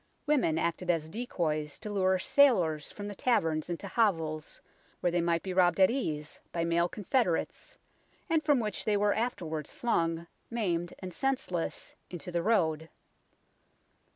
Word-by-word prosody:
Women 275 - +2
acted 170 +2 -1
as 160 -2 +1
decoys 155 -9 -2
to 210 - -7
lure 190 -2 +2
sailors 185 - +3
from 205 0 -7
the 205 - -5
taverns 165 -9 +1
into 175 +3 -4
hovels 165 -8 0 0.4
where 175 - +1
they 175 0 +1
might 170 0 +1
be 190 - -3
robbed 180 -1 +3
at 190 +3 +6
ease 155 - -3
by 170 -1 -1
male 170 +1 +2
confederates, 205 -3 -1 0.5
and 320 -1 +2
from 290 -3 +4
which 210 -6 -2
they 210 -1 +2
were 205 0 +3
afterwards 165 - -3
flung, 165 -8 0 0.2
maimed 175 -7 -1
and 185 -2 -7
senseless, 255 -7 -2 0.2
into 175 -1 -6
the 170 -1 0
road. 160 -6 +1
175 Hz, 150 wpm, -30 LUFS, 165-215 Hz, 0.5 s, at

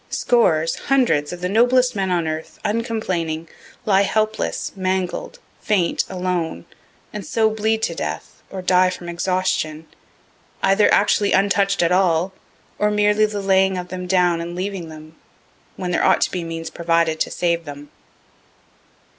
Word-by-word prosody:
Scores, 165 -9 +2
hundreds 235 - +2
of 175 0 -7
the 180 - -1
noblest 245 +4 +3
men 195 -2 -1
on 175 -3 0
earth, 155 0 -5
uncomplaining, 190 -8 -2 0.4
lie 200 -3 +4
helpless, 215 +2 -1
mangled, 185 -1 -2 0.2
faint, 185 -5 +1
alone, 180 - -3 0.5
and 210 -1 -5
so 220 +2 +1
bleed 220 +1 0
to - - 0
death, - - -6
or 190 -1 -7
die 185 0 +4
from 175 -1 -7
exhaustion, 170 -3 -1 0.8
either 195 +2 +4
actually 205 0 +3
untouch'd 195 -1 +2
at 170 - +2
all, 180 0 +2 0.5
or 210 - +2
merely 210 +1 +3
the 205 -1 -5
laying 190 -1 +3
of 180 0 -6
them 180 0 -6
down 180 -2 +2
and 170 +1 -6
leaving 185 -2 -4
them, 155 0 -12 0.6
when 180 -1 -4
there - - +1
ought - - +4
to - - +1
be 180 -2 -3
means 165 0 -6
provided 165 -1 0
to - - 0
save 170 -1 -1
them. 145 0 -10
185 Hz, 150 wpm, -21 LUFS, 170-205 Hz, 0.8 s, lie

